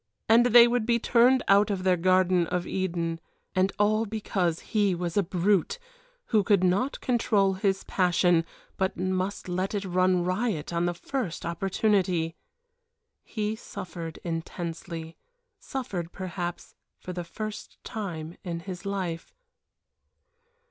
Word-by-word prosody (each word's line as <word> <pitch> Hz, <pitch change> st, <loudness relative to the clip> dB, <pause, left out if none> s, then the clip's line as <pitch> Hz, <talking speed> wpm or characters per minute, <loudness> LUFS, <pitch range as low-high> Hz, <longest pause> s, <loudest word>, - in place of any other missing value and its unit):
and 235 Hz, +2 st, +6 dB
they 240 Hz, 0 st, +8 dB
would 240 Hz, -1 st, +1 dB
be 235 Hz, +1 st, +2 dB
turned 245 Hz, +2 st, +4 dB
out 200 Hz, +2 st, +5 dB
of 195 Hz, -3 st, -2 dB
their 185 Hz, -1 st, +4 dB
garden 185 Hz, 0 st, +3 dB
of 180 Hz, +1 st, -2 dB
Eden 170 Hz, -3 st, -2 dB, 0.3 s
and 185 Hz, +1 st, +2 dB
all 215 Hz, +2 st, +2 dB
because 190 Hz, -6 st, -1 dB
he 205 Hz, -4 st, +3 dB
was 170 Hz, -1 st, -3 dB
a 205 Hz, -, +4 dB
brute, 190 Hz, -, +1 dB, 0.6 s
who 215 Hz, -, +6 dB
could 200 Hz, -3 st, +3 dB
not 195 Hz, +10 st, +1 dB
control 210 Hz, -5 st, +2 dB
his 195 Hz, 0 st, 0 dB
passion, 175 Hz, -2 st, +2 dB, 0.3 s
but 190 Hz, 0 st, -1 dB
must 185 Hz, +2 st, -2 dB
let 185 Hz, +3 st, -2 dB
it 200 Hz, -1 st, -2 dB
run 185 Hz, 0 st, +2 dB
riot 185 Hz, -4 st, -1 dB
on 170 Hz, +1 st, +1 dB
the 175 Hz, -, -1 dB
first 205 Hz, -, -4 dB
opportunity. 180 Hz, -1 st, 0 dB, 0.9 s
He 215 Hz, -1 st, -3 dB
suffered 170 Hz, -6 st, -7 dB
intensely. 165 Hz, -1 st, -5 dB, 0.4 s
Suffered, 190 Hz, -10 st, -4 dB
perhaps, 175 Hz, -2 st, -5 dB, 0.2 s
for 180 Hz, -, -7 dB
the 175 Hz, 0 st, -4 dB
first 215 Hz, +5 st, -7 dB
time 170 Hz, -6 st, -5 dB
in 170 Hz, -3 st, -4 dB
his 185 Hz, +1 st, -7 dB
life. 185 Hz, -4 st, -4 dB
185 Hz, 135 wpm, -27 LUFS, 175-210 Hz, 0.9 s, they